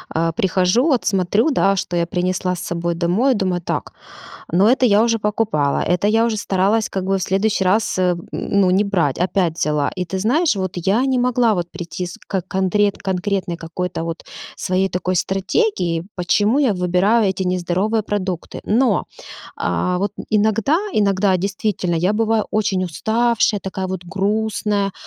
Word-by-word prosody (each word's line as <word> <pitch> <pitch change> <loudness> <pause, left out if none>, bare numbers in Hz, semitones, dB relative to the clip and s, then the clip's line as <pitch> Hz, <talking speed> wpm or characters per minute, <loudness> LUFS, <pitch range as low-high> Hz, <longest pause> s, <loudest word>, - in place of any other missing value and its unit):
э, 165 0 +1
прихожу, 185 - +2
вот 260 -6 +1
смотрю, 200 - +2
да, 195 -7 +2
что 180 -2 -3
я 170 -1 +1
принесла 180 +1 -1
с - - -8
собой 170 0 -2
домой, 185 +11 +2
и - - +2
думаю: 185 -4 -1
"Так, - - -4 0.6
ну, 185 +4 +4
это 250 +2 +4
я 210 0 +4
уже 230 -1 +1
покупала, 205 -9 0
это 180 +3 +1
я 225 +1 +3
уже 225 -2 0
старалась 200 +2 +1
как 190 -1 -3
бы 195 0 +1
в - - -4
следующий 195 +1 0
раз, 195 +1 +1
э, 180 -1 +2 0.2
ну, 200 -2 +1
не 195 +3 +3
брать, 175 -9 0
опять 180 -2 0
взяла". 150 -1 0
И 180 - -2
ты 190 +2 -4
знаешь, 260 - +2
вот 185 -2 -2
я 195 +8 +1
не 260 -1 +1
могла 245 -2 +2
вот 175 -2 -3
прийти 180 0 -5
с 175 - -9
ко 190 -2 -1
контре 190 +3 +1
конкретной 190 -2 -2
какой-то 165 +1 -4
вот 165 0 -5 0.3
своей 185 +1 0
такой 185 0 -2
стратегии, 190 - 0
почему 205 +8 +1
я 260 -7 +3
выбираю 185 +5 +2
эти 190 0 -2
нездоровые 185 +4 0
продукты. 190 -4 -4
Но, 245 +5 +2 0.5
а-а, 180 0 -1
вот 200 +2 -1 0.2
иногда, 220 +7 +2 0.2
иногда, 200 - +2
действительно, 195 -1 -2
я 180 +5 +1
бываю 220 0 +1
очень 195 -3 0
уставшая, 220 +4 +1
такая 190 0 -4
вот 185 -1 -5
грустная, 205 +1 -1
195 Hz, 170 wpm, -19 LUFS, 180-215 Hz, 0.6 s, ну